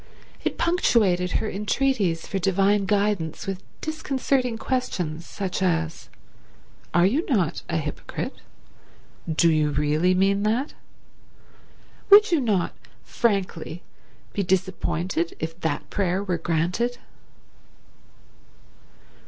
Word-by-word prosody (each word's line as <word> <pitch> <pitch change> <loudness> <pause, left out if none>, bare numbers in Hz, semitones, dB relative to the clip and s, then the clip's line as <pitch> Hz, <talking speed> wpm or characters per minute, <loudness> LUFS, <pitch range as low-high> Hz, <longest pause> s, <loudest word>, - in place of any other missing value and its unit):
It - - -1
punctuated 205 - +2
her - - 0
entreaties 205 -4 0
for 195 - -2
divine 195 +2 +2
guidance 200 -5 0
with 195 -1 -4 0.2
disconcerting 270 -6 -1
questions, 180 - -2
such 190 -2 -4
as, 165 -3 -1 0.8
"Are 175 0 +4
you 265 - +2
not 185 - +1
a - - 0
hypocrite? 150 -2 -4 1.0
Do 165 +1 +4
you 155 -1 +2
really 150 +5 +2
mean 195 +2 +3
that? 230 +7 0 1.4
Would 410 0 +8
you 335 - +4
not, 205 -8 +1 0.3
frankly, 185 -7 -1 0.5
be 205 - 0
disappointed 180 -2 -1
if 165 +2 -5
that 155 -3 -2
prayer 190 -1 0
were 180 -4 -1
granted?" 175 +10 0
190 Hz, 105 wpm, -24 LUFS, 165-220 Hz, 1.4 s, Would